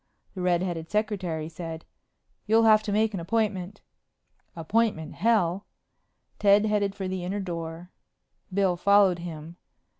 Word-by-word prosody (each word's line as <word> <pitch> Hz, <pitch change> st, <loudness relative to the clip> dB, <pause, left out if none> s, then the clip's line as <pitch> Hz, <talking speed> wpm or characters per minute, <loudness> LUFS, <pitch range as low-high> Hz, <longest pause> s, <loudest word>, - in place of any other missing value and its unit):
The 185 Hz, -, -6 dB
red 180 Hz, -1 st, +2 dB
headed 165 Hz, -3 st, -4 dB
secretary 190 Hz, -7 st, -2 dB
said, 165 Hz, -1 st, -7 dB, 0.6 s
"You'll 225 Hz, +1 st, +4 dB
have 215 Hz, -1 st, +6 dB
to 215 Hz, -, -4 dB
make 215 Hz, +1 st, +1 dB
an 195 Hz, -, -3 dB
appointment." 205 Hz, 0 st, -2 dB, 0.7 s
"Appointment 170 Hz, 0 st, 0 dB
hell!" 200 Hz, -3 st, +1 dB, 0.7 s
Ted 205 Hz, +1 st, +5 dB
headed 205 Hz, -2 st, 0 dB
for 195 Hz, -2 st, -4 dB
the 185 Hz, -1 st, -4 dB
inner 190 Hz, +3 st, -3 dB
door. 170 Hz, -1 st, -6 dB, 0.6 s
Bill 190 Hz, -1 st, +2 dB
followed 195 Hz, -1 st, +4 dB
him. 165 Hz, -1 st, -8 dB
190 Hz, 130 wpm, -26 LUFS, 170-210 Hz, 0.7 s, have